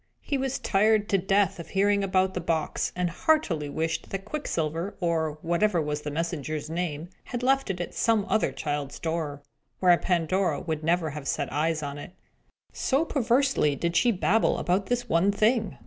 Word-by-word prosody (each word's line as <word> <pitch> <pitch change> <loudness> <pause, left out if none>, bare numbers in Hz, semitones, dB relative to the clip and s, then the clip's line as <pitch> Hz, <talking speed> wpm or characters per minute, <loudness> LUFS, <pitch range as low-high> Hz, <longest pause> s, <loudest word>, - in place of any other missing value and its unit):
He 285 - -2
was 270 -1 -1
tired 210 +1 +2
to 195 - +3
death 195 0 +1
of 170 - -7
hearing 200 +1 +2
about 190 -1 +1
the 180 - -3
box, 165 -2 -1
and 180 0 0
heartily 175 - +1
wished 160 +2 -2
that 195 0 -5
Quicksilver, 170 - -3
or 160 -3 0
whatever 175 +3 +2
was 150 -1 -2
the 150 - -4
messenger's 155 -1 -3
name, 165 -1 -3 0.2
had 245 0 -5
left 270 -1 +2
it 185 -2 -2
at 175 - -4
some 225 -3 +2
other 220 - +1
child's 145 -2 -4
door, 160 -4 -3 0.4
where 180 -1 +6
Pandora 175 -2 +1
would 160 -2 -4
never 165 -1 +1
have 145 -1 -7
set 145 -3 -2
eyes 155 +1 0
on 145 0 -5
it. 175 - -10 0.6
So 280 +4 +1
perseveringly 260 - +2
as 140 - -7
did 170 0 -1
she 240 +7 +4
babble 215 +2 +2
about 190 +2 0
this 245 0 -1
one 185 +1 +3
thing! 215 0 +1
175 Hz, 180 wpm, -27 LUFS, 155-205 Hz, 0.6 s, where